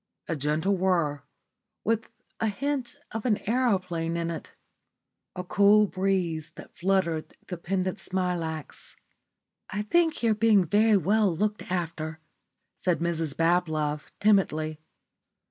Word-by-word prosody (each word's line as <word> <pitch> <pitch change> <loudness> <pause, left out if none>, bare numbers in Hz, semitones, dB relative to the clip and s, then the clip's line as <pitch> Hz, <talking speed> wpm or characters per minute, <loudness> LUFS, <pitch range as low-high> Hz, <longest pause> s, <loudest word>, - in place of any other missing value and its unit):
A 165 - -1
gentle 155 +7 +1
whirr, 170 -6 +1 0.6
with 225 0 0 0.3
a 225 - +1
hint 270 +4 -2 0.2
of 225 0 -4
an 220 -5 +2
aeroplane 185 -9 0
in 170 0 -1
it. 165 - -7 0.8
A 180 - -4
cool 205 +3 +5
breeze 185 -5 -1
that - - -12
fluttered 170 -4 0
the 180 - -5
pendent 185 +2 -2
smilax. 175 -5 -3 0.7
"I 205 +2 -2
think 325 +5 +2
you're 225 -1 +4
being 215 -3 +4
very 210 +4 +4
well 200 +3 +3
looked 210 -1 -2
after," 160 -3 -3 0.6
said 180 -2 +1
Mrs 165 -3 -2
Bablove, 160 -3 +1
timidly. 155 -7 +2
185 Hz, 120 wpm, -27 LUFS, 165-210 Hz, 0.8 s, cool